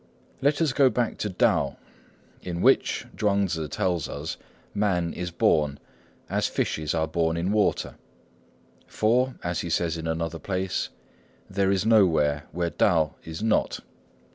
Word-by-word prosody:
Let 145 +4 +2
us 145 -5 +1
go 135 0 +5
back 120 -2 -1
to 105 - -1
Tao, 90 - +1 0.6
in 85 -1 -4
which, - - +3
Chuang 100 -1 +2
Tzŭ 80 -4 -3
tells 85 -3 -1
us, 75 +3 -5 0.4
man 95 -5 0
is 90 0 -4
born, 75 -4 +2 0.5
as - - 0
fishes 80 0 -1
are 80 -1 +1
born 80 +1 0
in 90 +4 0
water; 105 -1 +1 0.9
for, 125 +4 +1
as 85 -1 -1
he 85 - -3
says 85 0 0
in 80 0 -5
another 80 0 -2
place, 95 +2 -2 0.6
there 95 0 0
is 100 +1 +1
nowhere 80 -10 +3
where 85 0 -2
Tao 80 -7 +2
is 80 +5 -6
not. 110 - +1
90 Hz, 145 wpm, -26 LUFS, 80-100 Hz, 0.9 s, go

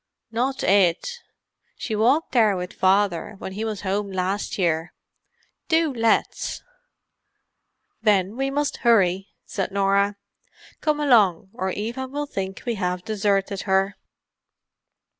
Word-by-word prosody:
"Not 255 +4 -1
it—she 200 - -1
walked 255 +9 +2
there 215 -6 +4
with 180 0 -5
Father 195 0 +1
when 190 - -7
he 205 +3 -4
was 215 -3 -3
home 200 +1 -2
last 190 +2 -2
time. 170 -3 0 0.8
Do 320 -3 +2
let's." 230 -2 0 1.4
"Then 205 -2 +2
we 270 +2 -1
must 290 +1 -1
hurry," 195 -5 +3 0.2
said 195 - -3
Norah. 200 +1 +2 0.7
"Come 305 -1 +1
along, 205 - +3
or 190 -4 -2
Eva 235 +7 -4
will 290 +3 -3
think 195 -8 -5
we 240 - 0
have 180 0 -2
deserted 200 -2 0
her." 195 +1 +2
205 Hz, 120 wpm, -23 LUFS, 190-235 Hz, 1.4 s, there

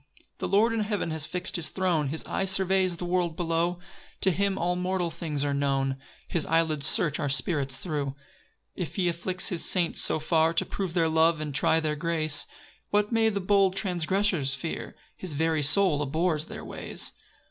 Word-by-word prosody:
3 - - -22
The - - -2
Lord 220 +4 +3
in 225 - -1
heaven 210 -5 -1
has 155 -1 -2
fix'd 180 +1 -2
his 170 - -1
throne, 175 -6 0
His 155 +4 -4
eye 195 - -1
surveys 190 -2 +2
the 175 - -4
world 175 -2 0
below; 170 +1 0 0.4
To 190 - +4
him 195 +2 0
all 175 +1 0
mortal 180 -1 -1
things 155 -3 -3
are 140 - 0
known, 135 -1 0 0.3
His 170 - 0
eyelids 160 -3 +1
search 150 -4 +2
our 145 - -1
spirits 135 0 +1
thro'. 150 -4 -3
4 135 0 -5 0.6
If 180 -4 -4
he 185 -3 +1
afflicts 180 +2 -1
his 175 - -2
saints 175 -3 +2
so - - +3
far 160 +1 +2
To - - +2
prove 190 -3 -4
their 165 -2 +3
love, 160 0 +3
and 150 -2 -4
try 160 +3 +3
their 155 -1 -1
grace, 155 -2 0 0.4
What 210 +1 +1
may 225 -1 +3
the 200 -2 -2
bold 195 0 +3
transgressors 180 -5 0
fear? 160 +5 -5 0.2
His 180 -6 -6
very 160 0 +1
soul 150 +1 +4
abhors 155 +2 0
their - - -8
ways. - - -3
170 Hz, 190 wpm, -27 LUFS, 155-185 Hz, 0.6 s, To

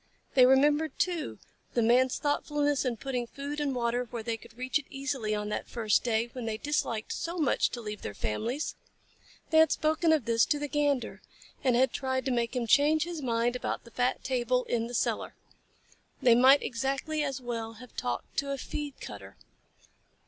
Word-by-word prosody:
They 255 -2 +7
remembered, 295 +4 +3
too, 345 -2 -1 0.4
the 235 - +3
Man's 250 +3 +4
thoughtfulness 290 -1 0
in 245 -2 -1
putting 250 -1 -3
food 280 +4 -5
and 285 -3 -1
water 240 0 0
where 230 -1 -6
they 230 0 -1
could 230 +1 -15
reach 255 +4 0
it 280 - -13
easily 270 -6 -2
on 210 0 -3
that - - -4
first 220 -3 +1
day, 235 0 0
when 250 -3 -5
they 220 -1 -2
disliked 235 -5 -1
so 340 +2 -4
much 305 -4 +2
to 240 - -6
leave 210 -2 -6
their 100 - -6
families. 230 - -2 0.8
They 315 - +6
had 320 - +6
spoken 315 +2 +2
of 305 -7 +2
this 230 -1 +3
to 295 - +2
the 295 0 -3
Gander, 290 -3 0 0.4
and 255 -3 +3
had 260 +2 +3
tried 260 -1 -1
to 265 - 0
make 235 0 0
him 245 -2 0
change 295 +6 +4
his 340 -2 -5
mind 240 -1 0
about 250 - -3
the 235 - -15
fat 250 +2 0
table 250 -1 +1
in 230 -2 -1
the 245 - -6
cellar. - - -1 0.8
They 245 - +6
might 260 +4 +6
exactly 270 +5 -2
as 275 -2 -2
well 230 -2 -4
have 235 +2 -14
talked 120 0 -4
to 280 - 0
a 275 - -2
feed 290 +1 -5
cutter. - - -9
255 Hz, 190 wpm, -29 LUFS, 235-290 Hz, 0.8 s, They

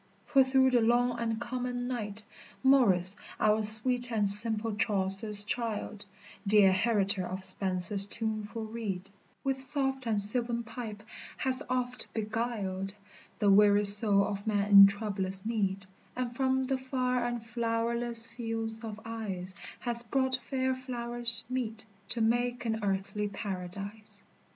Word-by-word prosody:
for 275 -2 +3
through 260 0 +2
the 245 -2 +2
long 240 +1 0
and 225 -1 -3
common 245 0 -5
night, 215 -4 -4 0.4
Morris, 200 -9 +3 0.2
our 215 0 +1
sweet 245 +4 +5
and 210 -3 0
simple 220 +1 +5
Chaucer's 205 0 0
child, 215 -2 -5 0.4
Dear 200 -2 +4
heritor 200 -1 0
of 185 +1 -7
Spenser's 190 +1 +3
tuneful 220 0 -5
reed, 200 -4 -7 0.3
With 270 -1 -2
soft 265 -1 -1
and 215 -2 0
sylvan 235 +3 -1
pipe 225 -3 -9 0.3
has 260 +1 +1
oft 250 0 -2
beguiled 210 -3 -4 0.4
The 205 -2 +2
weary 205 +1 +4
soul 205 0 +8
of 200 +1 -6
man 205 -1 -1
in 200 -1 +9
troublous 195 -2 -4
need, 200 -4 -3 0.3
And 245 -1 -5
from 265 0 0
the 265 0 -2
far 255 -1 -2
and 240 -1 -5
flowerless 230 0 -2
fields 225 -1 -4
of 215 -2 -8
ice 195 -5 -6 0.3
Has 235 -1 -3
brought 260 +2 -1
fair 260 +1 -3
flowers 240 -2 +5
meet 225 -3 -5 0.2
to 235 - -3
make 240 +2 -1
an 220 -1 -2
earthly 200 +1 -3
paradise. 200 +1 -7
225 Hz, 135 wpm, -28 LUFS, 205-245 Hz, 0.4 s, in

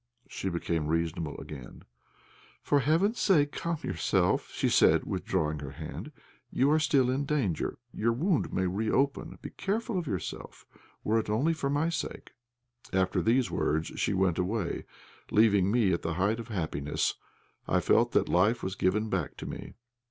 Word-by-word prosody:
She 95 - -4
became 85 -3 -1
reasonable 80 -1 -1
again. 65 -5 -10 0.8
"For 145 - +3
heaven's 165 - +2
sake, 145 -7 +3
calm 170 -1 -2
yourself," 90 -3 +1
she - - 0
said, - - +5
withdrawing 75 -1 -1
her 70 -1 -7
hand. - - -7 0.4
"You 135 +3 +3
are 155 - +4
still 135 -5 +3
in 135 +2 0
danger; 135 - -1 0.2
your 115 +2 +1
wound 160 - 0
may 95 - 0
reopen; 110 +9 0
be - - -6
careful 220 0 -2
of 170 - -5
yourself 95 -8 -5 0.4
were 110 +2 +2
it 110 - -4
only 135 +10 +2
for 145 -4 -2
my 145 +4 +1
sake." 170 - -5 0.6
After 95 -1 +1
these 120 +2 +2
words 80 +2 0
she - - 0
went 95 -3 +2
away, 90 0 -2 0.4
leaving 100 -3 +4
me 105 -4 +3
at 85 - -1
the 80 -1 -2
height 100 +6 +1
of 115 - -7
happiness. 80 - -1 0.5
I - - +3
felt - - +3
that - - +3
life 100 +7 +2
was 95 - -2
given 105 +3 +1
back 95 -7 -2
to - - -7
me. - - -7
105 Hz, 165 wpm, -29 LUFS, 90-140 Hz, 0.8 s, said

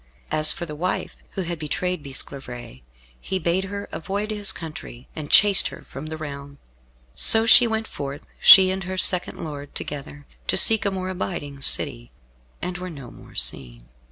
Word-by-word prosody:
As 155 0 +5
for 170 - -3
the 150 - -8
wife 180 +5 -3 0.2
who 190 - -3
had 170 -1 -5
betrayed 180 +3 -3
Bisclavaret, 125 - -7 0.4
he 190 - -3
bade 180 +2 -1
her 200 +1 -6
avoid 200 +5 -4
his 205 -2 -1
country, 155 -6 -10
and 150 -2 -7
chased 205 -2 +5
her - - -11
from 135 +3 -8
the 160 0 -6
realm. 140 -2 -8 0.6
So 225 0 +5
she 240 +1 +8
went 220 0 -2
forth, 140 -5 -7
she 190 -1 +8
and 190 -1 -4
her 185 +1 -5
second 180 -1 +4
lord 145 -3 -8
together, 145 0 -7 0.2
to - - +1
seek 220 -2 +5
a - - +2
more 185 -1 -4
abiding 160 -7 -5
city, - - -2 0.5
and 180 0 -4
were 185 0 -6
no 140 -7 -10
more - - -16
seen. - - -4
160 Hz, 175 wpm, -23 LUFS, 140-190 Hz, 0.6 s, she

